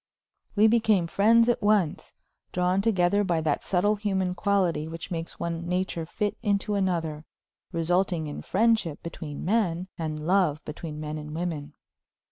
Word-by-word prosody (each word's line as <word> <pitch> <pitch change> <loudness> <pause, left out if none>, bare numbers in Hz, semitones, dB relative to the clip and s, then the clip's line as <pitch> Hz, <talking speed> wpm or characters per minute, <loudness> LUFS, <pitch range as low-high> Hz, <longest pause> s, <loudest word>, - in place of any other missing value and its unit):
We 210 +1 +5
became 220 -5 +4
friends 225 +7 +4
at 240 - +1
once, 205 -6 +1 0.4
drawn 180 +2 +1
together 200 -1 +2
by 175 -4 +1
that 155 -2 0
subtle 205 +3 +1
human 190 -3 0
quality 180 -4 +1
which 165 +2 -7
makes 165 -1 -5
one 170 0 -3
nature 180 -2 -1
fit 205 +4 -2
into 205 -2 0
another, 170 -6 -1 0.5
resulting 175 0 +1
in 145 - -6
friendship 220 -7 +1
between 155 -3 -6
men, 185 -3 0
and 155 -1 -3
love 175 -4 +2
between 150 0 -6
men 155 0 -4
and 150 0 -7
women. 160 -4 -4
180 Hz, 145 wpm, -27 LUFS, 160-200 Hz, 0.5 s, We